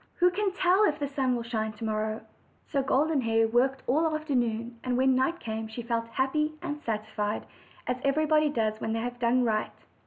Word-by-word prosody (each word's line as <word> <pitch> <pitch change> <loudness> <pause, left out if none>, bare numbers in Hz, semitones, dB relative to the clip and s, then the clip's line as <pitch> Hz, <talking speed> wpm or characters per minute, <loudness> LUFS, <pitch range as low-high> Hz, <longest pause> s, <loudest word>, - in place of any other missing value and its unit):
"Who 360 +1 +4
can. 400 +2 0
tell 375 +2 +3
if 300 -5 +1
the 285 - -2
sun 270 -2 0
will 235 - -3
shine 220 -2 -2
to 215 - -10
morrow?" 215 0 -1 0.4
So 280 - 0
Golden 280 +2 +2
Hair 225 -1 +2
worked 260 +3 +2
all 315 +6 +2
the 310 - -2
afternoon, 240 -6 -1
and 250 -1 0
when 265 +1 +4
night 265 +7 +1
came 220 -3 -4
she 220 +2 -7
felt 230 -1 -1
happy 285 +6 0
and 295 0 -5
satisfied, 215 -2 -2 0.4
as 250 - -1
everybody 305 +2 +3
doea 220 -4 -1
when 220 - -1
they 225 - -1
have 245 +1 -4
done 245 +1 +3
right. 215 -2 0
250 Hz, 205 wpm, -28 LUFS, 225-295 Hz, 0.4 s, Who